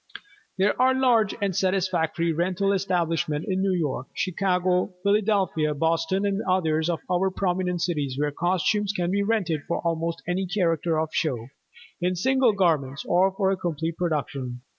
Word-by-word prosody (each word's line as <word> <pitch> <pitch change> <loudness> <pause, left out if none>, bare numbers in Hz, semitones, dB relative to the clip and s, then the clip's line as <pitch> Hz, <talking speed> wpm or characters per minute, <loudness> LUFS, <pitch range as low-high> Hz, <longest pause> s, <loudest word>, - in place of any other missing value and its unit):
There 200 +6 +2
are 260 0 +4
large 240 -6 +3
and 195 -3 0
satisfactory 175 -3 0
rental 185 +4 0
establishments 165 -5 -1
in 190 -1 0
New 195 -1 +1
York, 145 -6 -2
Chicago, 185 0 0
Philadelphia, 200 -7 +1
Boston, 165 +5 0
and 200 +1 0
others 160 -3 +1
of 170 - -1
our 185 +1 +1
prominent 180 -2 -1
cities 145 -7 -2
where 145 0 0
costumes 190 +6 0
can 175 -3 -1
be 200 +1 +1
rented 200 -8 0
for - - -1
almost 165 0 -2
any 185 +2 -1
character 170 -4 0
of 160 0 -1
show, 125 -7 -1 0.5
in 180 +1 +1
single 260 +4 +3
garments 155 -8 0
or 185 +2 +3
for 195 -1 +1
a 195 - 0
complete 165 -2 -3
production. 140 -7 -3
180 Hz, 155 wpm, -25 LUFS, 160-195 Hz, 0.5 s, are